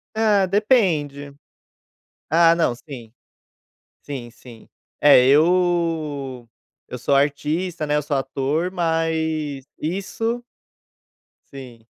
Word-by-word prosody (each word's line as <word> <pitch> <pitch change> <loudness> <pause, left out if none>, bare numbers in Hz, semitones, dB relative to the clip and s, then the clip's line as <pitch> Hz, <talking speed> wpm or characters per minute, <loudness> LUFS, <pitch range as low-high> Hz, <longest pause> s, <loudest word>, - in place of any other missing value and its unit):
Ah, 210 -3 +3
depende. 175 - 0 1.0
Ah 165 +1 +5
não, 165 -8 +1
sim. 120 -4 -11 0.9
Sim, 130 -5 -7
sim. 120 -1 -16 0.3
É 135 -3 +6
eu 155 -5 +1 0.4
eu 125 - -7
sou 135 +3 0
artista, 150 +4 -1
né, 150 0 0
eu 150 - 0
sou 145 0 -2
ator 140 +6 -2
mas, 160 -4 -1
isso 225 +8 -3 1.1
Sim. 120 -4 -11
150 Hz, 95 wpm, -21 LUFS, 135-175 Hz, 1.1 s, É